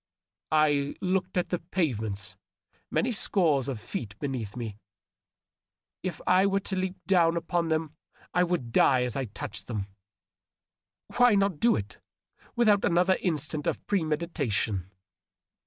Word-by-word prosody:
I 145 -2 +2
looked 185 0 -1
at 180 - 0
the 180 - -1
pavements, 110 - -2 0.5
many 250 - +1
scores 165 - +2
of 130 -5 -3
feet 105 0 -6
beneath 125 -7 -4
me. 110 -4 -5 1.2
If 180 -3 -4
I 185 +2 +5
were 195 0 +2
to 195 - -3
leap 185 0 -2
down 170 -3 +4
upon 170 0 -1
them 160 -1 -1 0.4
I 180 - +3
would 170 -10 -1
die 130 +2 +4
as 125 -2 -1
I 135 - -1
touched 100 -1 -6
them. 105 -5 -3 1.3
Why 245 -3 +6
not 195 -5 +1
do 235 - +4
it, 100 -1 -5 0.6
without 215 -4 +4
another 180 +2 +3
instant 155 -3 -1
of - - -2
premeditation 150 - -1
160 Hz, 135 wpm, -28 LUFS, 125-185 Hz, 1.3 s, Why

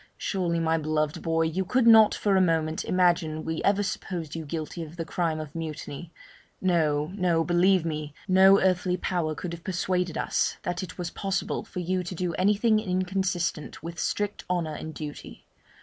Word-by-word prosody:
Surely, 175 -4 -1
my 165 0 +1
beloved 155 0 -1
boy, 165 -1 +1
you 165 +4 0
could 250 +6 +1
not 220 -2 +7
for 200 -2 +1
a 190 - +5
moment 160 -2 +1
imagine 175 -4 +1
we 160 0 -2
ever 200 +1 +2
supposed 170 -5 -4
you 165 -1 -5
guilty 160 +2 -4
of 160 0 -8
the 165 -1 -4
crime 165 -2 -1
of 155 -1 -7
mutiny. 160 0 -6 0.5
No, 155 -4 +1
no; 175 -4 +2
believe 175 +1 +3
me, 150 -2 -4
no 190 +1 +6
earthly 185 -1 +1
power 165 -3 -1
could 170 +2 -5
have 170 0 -9
persuaded 180 -2 -1
us - - 0
that 175 0 -2
it 185 -2 -8
was 175 -1 -4
possible 195 -1 -2
for 180 - -6
you 185 +1 0
to 180 +1 -6
do 175 0 -2
anything 210 +5 +3
inconsistent 180 -5 -2
with 170 +1 -6
strict 205 0 -2
honour 170 -4 -1
and 160 +1 -7
duty. 150 -2 -8
175 Hz, 180 wpm, -27 LUFS, 160-185 Hz, 0.5 s, not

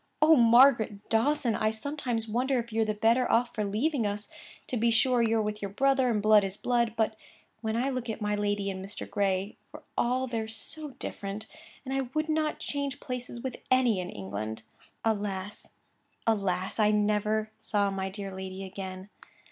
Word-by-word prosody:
'Oh, 315 +1 +7
Margaret 235 -4 +5
Dawson! 235 +1 +2
I 215 - +1
sometimes 235 -1 -3
wonder 255 +4 +1
if 235 -2 -4
you're 225 0 +2
the 215 0 -1
better 230 +4 +3
off 240 +1 +2
for 215 - -1
leaving 225 +4 0
us. 205 0 -4 0.4
To - - -1
be 235 0 +2
sure 245 +2 +4
you're 225 -1 +2
with 210 0 -3
your 200 - -3
brother, 265 +4 +2
and 210 -3 0
blood 215 -1 +6
is 195 +1 -3
blood. 235 -2 +1
But 220 0 +1 0.5
when 220 -1 -1
I 255 +4 +1
look 250 -2 -3
at 220 - -3
my 210 -1 -1
lady 205 -1 0
and 190 0 -6
Mr. 200 +2 -6
Gray, 195 -1 -1
for - - -12
all 255 +2 +1
they're 230 -3 -3
so 270 +6 -6
different, 200 +1 -5 0.4
I 265 -1 -1
would 310 +1 0
not 310 -1 +1
change 280 -1 -3
places 245 -2 -5
with 260 -2 -4
any 250 -6 +4
in 180 0 -4
England.' 105 +3 -5 0.4
Alas! 205 -2 -2 0.6
alas! 195 -3 0
I 210 -1 +5
never 210 +1 +1
saw 205 -2 0
my 190 0 -2
dear 195 0 -6
lady 190 0 -6
again. 190 0 -7
220 Hz, 180 wpm, -29 LUFS, 205-245 Hz, 0.6 s, Oh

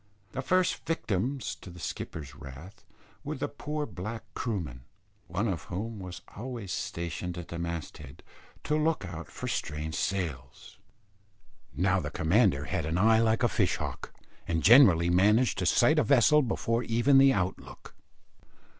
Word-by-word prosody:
The 130 - -3
first 185 +5 +1
victims 130 - -1
to - - -12
the 90 0 -12
skipper's 75 -4 -6
wrath 70 +10 -11 0.4
were 150 +2 -4
the 145 +1 -2
poor 150 +1 -4
black 110 +1 -6
Kroomen, 90 - -3 0.5
one 100 +7 -1
of 90 -9 -3
whom 105 +4 -5
was 90 -2 -8
always 115 -3 -6
stationed 85 +1 -4
at 85 - -7
the 85 - -5
mast 85 -2 -5
head, 70 -3 -12 0.4
to 150 - 0
look 155 -6 +1
out 85 -3 -7
for - - -7
strange 75 +1 -3
sails. 75 -11 -4 1.0
Now - - +2
the - - -4
commander 85 - +2
had 80 -1 -2
an 80 +2 -1
eye 110 +4 +5
like 115 +1 +2
a - - +5
fish - - +1
hawk, - - -6 0.4
and 80 -2 -1
generally 95 -8 +7
managed 105 +5 +3
to 90 - 0
sight 155 - +4
a - - +3
vessel 140 +3 +5
before 115 -2 -1
even 125 +4 +4
the 135 0 +7
out 95 -6 -1
look. - - -13
100 Hz, 160 wpm, -29 LUFS, 85-125 Hz, 1.0 s, generally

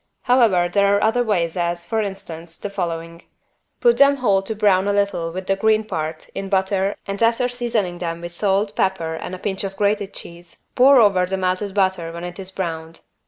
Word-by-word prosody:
However 230 -9 +4
there 200 +2 +3
are - - -1
other 225 +3 +2
ways 180 -8 0
as, 175 -1 -2
for 225 +2 -1
instance, 170 -5 -7
the 205 - -6
following: 170 -3 -4 0.6
Put 475 -1 +4
them 280 0 +6
whole 205 -8 +2
to 215 +3 -4
brown 200 -2 +3
a 205 - +1
little 200 -5 0
with 185 +2 -6
the 195 - +1
green 220 +2 +2
part 160 -6 -5
in 195 0 -5
butter 195 0 +1
and, 200 +1 -4
after 230 +2 +3
seasoning 230 -8 -2
them 170 -1 -3
with 175 0 -8
salt, 200 +2 0
pepper 180 -4 0
and 180 +3 -6
a - - -8
pinch 190 +1 -3
of 195 0 -4
grated 200 -1 0
cheese, 170 -2 -10
pour 265 +1 +6
over 195 -5 +4
the 190 +1 -2
melted 190 +2 -2
butter 185 -4 +1
when 170 +1 -8
it 175 +2 -7
is 190 -1 -6
browned. 165 -3 -5
195 Hz, 205 wpm, -21 LUFS, 175-210 Hz, 0.6 s, them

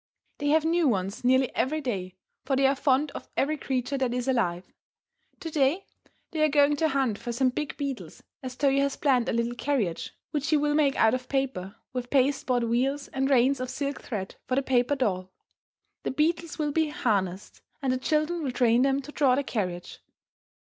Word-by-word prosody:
They 290 - -1
have 315 +2 +3
new 335 -1 +3
ones 195 -3 -1
nearly 260 +1 +3
every 310 +4 0
day, 190 -10 -4 0.3
for 270 0 0
they 270 +1 +3
are 270 - +5
fond 280 +1 +1
of - - -8
every 300 +3 +1
creature 265 -1 -2
that 250 -2 0
is 250 +1 -2
alive. 185 -9 0 0.8
To 325 - -5
day 300 +6 +1 0.5
they 315 - -2
are 310 - +4
going 290 0 +4
to 320 0 +2
hunt 265 -6 0
for 240 - -4
some 255 +2 +2
big 295 +3 -4
beetles, 280 -3 -5 0.2
as 255 -2 -6
Toyo 275 0 +2
has 280 -1 0
planned 260 -4 +2
a - - +1
little 235 +1 0
carriage 240 -10 -2 0.2
which 295 +1 -2
he 310 - +4
will 295 0 +1
make 295 -2 +3
out 220 +1 +4
of 255 0 -3
paper, 255 -8 -2 0.2
with 250 -1 -4
pasteboard 260 -2 +2
wheels 260 +5 0
and 270 0 -1
reins 265 0 +4
of 255 0 -3
silk 280 +2 -3
thread 195 -5 -5
for 255 - 0
the 275 - +1
paper 255 +1 +2
doll. 185 -8 -1 0.7
The - - -3
beetles 330 +4 0
will 300 -2 -1
be 315 +1 +1
harnessed, 200 -9 -2 0.2
and 265 -2 0
the 255 - -1
children 310 +5 0
will 275 -4 -2
train 240 -1 +3
them 275 +1 +2
to 295 - -9
draw 275 -4 +3
the 285 - 0
carriage. 180 -9 -4
265 Hz, 200 wpm, -27 LUFS, 245-290 Hz, 0.8 s, are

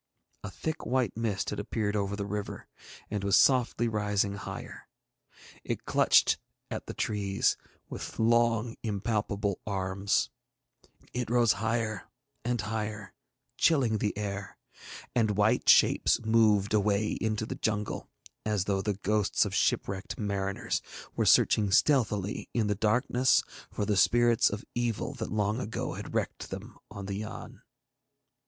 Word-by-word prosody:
A 105 - -5
thick 160 +10 -4
white 125 -4 0
mist 110 -3 -2
had - - -4
appeared 105 0 -2
over 100 -1 -1
the 100 -1 -3
river, 105 0 -5 0.4
and 105 -2 -2
was 100 0 +3
softly 125 -3 +3
rising 105 -2 0
higher. 100 - -8 0.8
It - - -4
clutched - - +4 0.3
at - - -5
the - - -6
trees 100 -2 0 0.3
with - - -7
long 115 0 +2
impalpable 105 -2 -1
arms, 95 0 0 0.8
it 125 -2 -2
rose 120 -2 +4
higher 110 0 -2 0.3
and 120 0 -1
higher, 105 -1 -4 0.5
chilling 125 -9 +3
the 105 -1 -1
air; 100 -1 -5 0.6
and 110 -4 +2
white 110 +4 +3
shapes - - +5
moved 110 -3 +3
away 105 0 +2
into 110 -1 -1
the 125 - -4
jungle 110 -6 -2 0.3
as 105 -3 0
though 100 -1 0
the 105 0 -1
ghosts 105 0 +2
of - - -4
shipwrecked 95 0 -1
mariners 100 -2 -2 0.3
were - - +1
searching 105 -2 +5
stealthily 105 -3 +2
in 115 -3 +2
the 105 - +1
darkness 120 +5 +2 0.3
for 105 - -3
the 105 0 +1
spirits 120 +2 +4
of 105 +2 -6
evil 120 +2 -1
that 115 -5 -5
long 105 +1 0
ago 115 -3 -3
had - - -7
wrecked - - -2
them - - -8
on 100 -1 -7
the 100 0 -4
Yann. 110 +1 -8
105 Hz, 140 wpm, -29 LUFS, 100-115 Hz, 0.8 s, shapes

